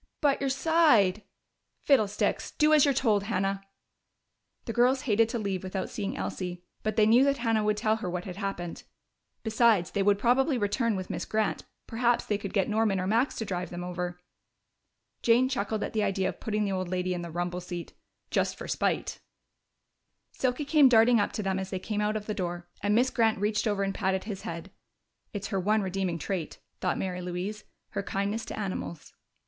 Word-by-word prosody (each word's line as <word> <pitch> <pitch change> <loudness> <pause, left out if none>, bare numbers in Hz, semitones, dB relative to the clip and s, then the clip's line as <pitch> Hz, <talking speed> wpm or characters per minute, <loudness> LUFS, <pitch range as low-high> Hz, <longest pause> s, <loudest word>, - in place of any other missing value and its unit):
"But 285 -2 +2
your 275 - +1
side 265 - +4 0.3
" - - -52
"Fiddlesticks! 215 -8 +2
Do 305 0 +5
as 300 -2 +6
you're 285 - +4
told, 210 -6 +2
Hannah." 195 -2 -1 1.0
The 230 - -3
girls 250 +3 +3
hated 225 -3 +2
to 235 - -2
leave 200 -4 -2
without 190 0 -4
seeing 200 -1 -3
Elsie, 180 -1 -4 0.2
but 215 -1 -2
they 215 -1 +5
knew 235 +4 +6
that 280 0 +2
Hannah 225 -2 +1
would 210 0 +1
tell 220 +1 +1
her 200 -5 -4
what 180 0 -4
had 185 -2 -7
happened. 195 -4 -4 0.6
Besides, 220 -5 +3
they 200 - 0
would 200 0 +4
probably 255 +6 +2
return 220 +1 0
with 185 -1 -4
Miss - - -3
Grant; 215 0 -1 0.2
perhaps 235 +1 +1
they 205 -1 -1
could 200 -2 -5
get 195 -3 +1
Norman 215 -2 +1
or 185 - -1
Max 230 +7 +1
to 225 - -3
drive 180 -2 -3
them 175 0 -6
over. 180 0 -4 1.0
Jane 240 +2 +4
chuckled 220 -4 -2
at - - -4
the 220 - +1
idea 195 -2 +1
of - - -8
putting 210 -1 -1
the 200 - -1
old 185 -2 -2
lady 185 0 -1
in 175 - -3
the 170 - -6
rumble 175 +2 -3
seat 175 -1 -7 0.4
just - - 0
for - - -7
spite! - - -1 1.1
Silky 260 +3 -1
came 290 -2 +6
darting 235 0 +6
up 205 - +1
to 215 - -3
them 190 -1 0
as 190 0 -4
they 190 - -3
came 210 +2 -3
out 210 +1 0
of 210 - -7
the 215 - -2
door, 175 -3 -4
and 205 +1 +2
Miss 250 +3 +3
Grant 225 -2 +2
reached 210 +3 0
over 205 -2 +1
and 195 0 -1
patted 190 -1 0
his 205 -3 -6
head. 170 +3 -6 0.6
("It's 205 -2 -5
her 195 - 0
one 210 +3 +2
redeeming 185 -2 -1
trait," 170 0 -4 0.2
thought 185 - 0
Mary 180 -1 -3
Louise 180 +4 -4 0.2
"her - - -3
kindness 200 +3 -2
to - - -7
animals.") 185 -6 -5
205 Hz, 200 wpm, -28 LUFS, 185-230 Hz, 1.1 s, as